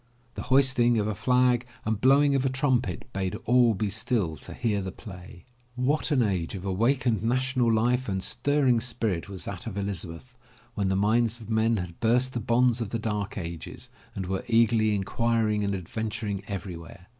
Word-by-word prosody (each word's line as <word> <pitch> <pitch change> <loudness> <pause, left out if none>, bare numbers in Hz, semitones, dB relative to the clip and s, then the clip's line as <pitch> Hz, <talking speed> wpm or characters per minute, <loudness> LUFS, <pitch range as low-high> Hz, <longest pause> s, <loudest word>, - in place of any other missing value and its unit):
The - - -6
hoisting 130 -3 +4
of 105 - +1
a 105 - -1
flag 125 +3 +2 0.2
and 110 -1 -1
blowing 140 +2 +5
of 135 -1 +1
a 135 - +1
trumpet 130 - 0
bade 95 -1 -2
all 120 -2 +4
be 105 0 -1
still 105 -5 -1
to - - -10
hear 110 -4 0
the 95 0 -5
play. 90 -1 -12 0.3
What 135 +6 0
an 135 -5 +3
age 95 -4 -1
of 95 0 -7
awakened 115 +4 +1
national 125 +1 +1
life 120 +2 +1
and 95 -1 -2
stirring 140 -4 +1
spirit 110 -7 -2
was 95 -2 -7
that - - -6
of 95 - -5
Elizabeth, 100 +3 -5 0.4
when 100 -3 -1
the 95 - +1
minds 115 +3 +2
of 115 0 -9
men 110 +1 +2
had 90 -3 -6
burst 125 +3 +2
the 120 - -2
bonds 120 +1 +2
of 110 - -3
the 115 - -2
Dark 105 -3 -3
Ages 85 -3 -7 0.2
and 95 - -3
were 95 +1 -3
eagerly 115 -2 +3
inquiring 105 +1 0
and 100 -1 -1
adventuring 105 +2 -4
every 95 -3 -5
where. 85 +1 -12
110 Hz, 185 wpm, -27 LUFS, 100-125 Hz, 0.4 s, blowing